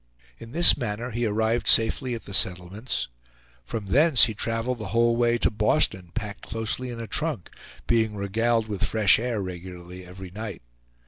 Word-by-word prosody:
In 115 Hz, 0 st, -11 dB
this 170 Hz, +5 st, +7 dB
manner 120 Hz, -1 st, -5 dB
he 120 Hz, +1 st, -1 dB
arrived 110 Hz, +2 st, -1 dB
safely 120 Hz, +2 st, +2 dB
at 115 Hz, -, -10 dB
the 100 Hz, -, -9 dB
settlements. 95 Hz, +7 st, 0 dB, 0.6 s
From 100 Hz, -, -6 dB
thence 145 Hz, -, +5 dB
he 110 Hz, -, -4 dB
traveled 115 Hz, +3 st, -3 dB
the 110 Hz, -, -6 dB
whole 115 Hz, +3 st, +2 dB
way 120 Hz, 0 st, +1 dB
to -, -, +1 dB
Boston 105 Hz, -, 0 dB
packed 105 Hz, -3 st, -5 dB
closely 115 Hz, +3 st, -3 dB
in 120 Hz, -1 st, -7 dB
a 115 Hz, -, -5 dB
trunk, 150 Hz, -, -2 dB, 0.3 s
being 110 Hz, -2 st, 0 dB
regaled 110 Hz, +3 st, -1 dB
with 105 Hz, -3 st, -4 dB
fresh 110 Hz, -2 st, +4 dB
air 115 Hz, -4 st, -3 dB
regularly 90 Hz, 0 st, -9 dB
every 90 Hz, 0 st, -11 dB
night. 105 Hz, -, -8 dB
110 Hz, 170 wpm, -24 LUFS, 100-120 Hz, 0.6 s, this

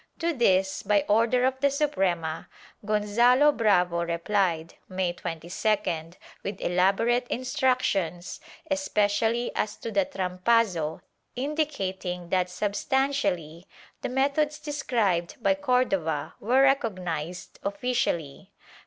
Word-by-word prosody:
To 335 Hz, 0 st, 0 dB
this, 190 Hz, -7 st, +2 dB
by 205 Hz, -1 st, +2 dB
order 230 Hz, +4 st, +3 dB
of 260 Hz, 0 st, 0 dB
the 280 Hz, +1 st, +3 dB
Suprema, 185 Hz, -, -1 dB, 0.3 s
Gonzalo 235 Hz, +7 st, +4 dB
Bravo 180 Hz, -8 st, +2 dB
repUed, 170 Hz, -1 st, 0 dB, 0.2 s
May 185 Hz, -2 st, -1 dB
22d 170 Hz, 0 st, -2 dB, 0.3 s
with 195 Hz, -1 st, -5 dB
elaborate 200 Hz, +8 st, +2 dB
instructions, 250 Hz, -, -1 dB, 0.3 s
especially 230 Hz, -4 st, +1 dB
as 210 Hz, -, -1 dB
to 230 Hz, -, -6 dB
the 200 Hz, -2 st, +2 dB
trampazo, 185 Hz, -3 st, 0 dB, 0.3 s
indicating 195 Hz, -, -3 dB
that 180 Hz, -1 st, +1 dB
substantially 200 Hz, -, -1 dB, 0.3 s
the -, -, -3 dB
methods 285 Hz, +3 st, +1 dB
described 235 Hz, -, -1 dB
by 245 Hz, -, +3 dB
Cordova 250 Hz, -, 0 dB
were 255 Hz, +5 st, +3 dB
recognized 180 Hz, -, -1 dB
officially. 200 Hz, -, -2 dB
205 Hz, 100 wpm, -26 LUFS, 180-255 Hz, 0.3 s, Gonzalo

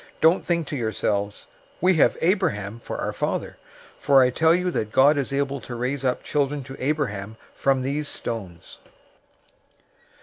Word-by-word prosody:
003:009 -, -, -22 dB
Don't 165 Hz, +3 st, +4 dB
think 170 Hz, -2 st, 0 dB
to 145 Hz, -, -5 dB
yourselves, 105 Hz, -4 st, -2 dB, 0.3 s
'We 185 Hz, +2 st, +4 dB
have -, -, +4 dB
Abraham 160 Hz, -, 0 dB
for -, -, -6 dB
our -, -, -3 dB
father,' -, -, -3 dB, 0.4 s
for 135 Hz, -2 st, +5 dB
I 125 Hz, -, +2 dB
tell 160 Hz, +5 st, +4 dB
you 180 Hz, 0 st, 0 dB
that 110 Hz, -9 st, -2 dB
God 140 Hz, +5 st, +5 dB
is 140 Hz, -1 st, -2 dB
able 140 Hz, -1 st, -1 dB
to 120 Hz, -, -7 dB
raise 125 Hz, +3 st, -2 dB
up 125 Hz, -1 st, 0 dB
children 145 Hz, -1 st, -1 dB
to 135 Hz, 0 st, -9 dB
Abraham 110 Hz, -8 st, -2 dB, 0.2 s
from 135 Hz, -1 st, +1 dB
these 145 Hz, +3 st, -2 dB
stones. 95 Hz, -12 st, -7 dB
135 Hz, 165 wpm, -24 LUFS, 115-150 Hz, 0.4 s, for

